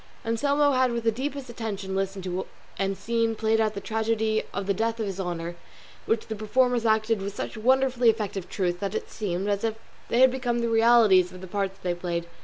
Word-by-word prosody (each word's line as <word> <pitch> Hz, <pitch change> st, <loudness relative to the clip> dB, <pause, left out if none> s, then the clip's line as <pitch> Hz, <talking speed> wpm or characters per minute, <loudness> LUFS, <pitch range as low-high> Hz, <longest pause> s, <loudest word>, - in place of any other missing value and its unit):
Anselmo 285 Hz, +6 st, +2 dB
had 255 Hz, -2 st, +3 dB
with 235 Hz, -1 st, -2 dB
the 225 Hz, -, +3 dB
deepest 270 Hz, +3 st, -4 dB
attention 205 Hz, -5 st, -4 dB
listened 195 Hz, 0 st, -2 dB
to 185 Hz, 0 st, -3 dB, 0.3 s
and 195 Hz, 0 st, 0 dB
seen 230 Hz, +2 st, 0 dB
played 220 Hz, 0 st, +2 dB
out 215 Hz, -1 st, 0 dB
the -, -, -3 dB
tragedy 220 Hz, 0 st, 0 dB
of 200 Hz, -, -3 dB
the 200 Hz, -, +1 dB
death 225 Hz, +3 st, -1 dB
of 220 Hz, -, -1 dB
his 195 Hz, -1 st, -5 dB
honour, 175 Hz, -2 st, -3 dB, 0.5 s
which 225 Hz, 0 st, +1 dB
the 220 Hz, -, -5 dB
performers 235 Hz, +2 st, +1 dB
acted 220 Hz, -1 st, +2 dB
with 200 Hz, +1 st, -5 dB
such -, -, -4 dB
wonderfully 250 Hz, +1 st, +3 dB
effective 205 Hz, -4 st, -2 dB
truth 175 Hz, -2 st, -1 dB
that 200 Hz, +2 st, -3 dB
it -, -, -4 dB
seemed 195 Hz, -2 st, -2 dB
as 200 Hz, 0 st, 0 dB
if 225 Hz, -1 st, 0 dB, 0.3 s
they 240 Hz, -, +3 dB
had 260 Hz, -1 st, +7 dB
become 245 Hz, -2 st, -1 dB
the 235 Hz, -1 st, 0 dB
realities 225 Hz, -5 st, +5 dB
of 185 Hz, -, -10 dB
the -, -, -7 dB
parts 195 Hz, 0 st, -2 dB
they 180 Hz, -1 st, 0 dB
played. 175 Hz, -1 st, -3 dB
220 Hz, 210 wpm, -26 LUFS, 195-235 Hz, 0.5 s, had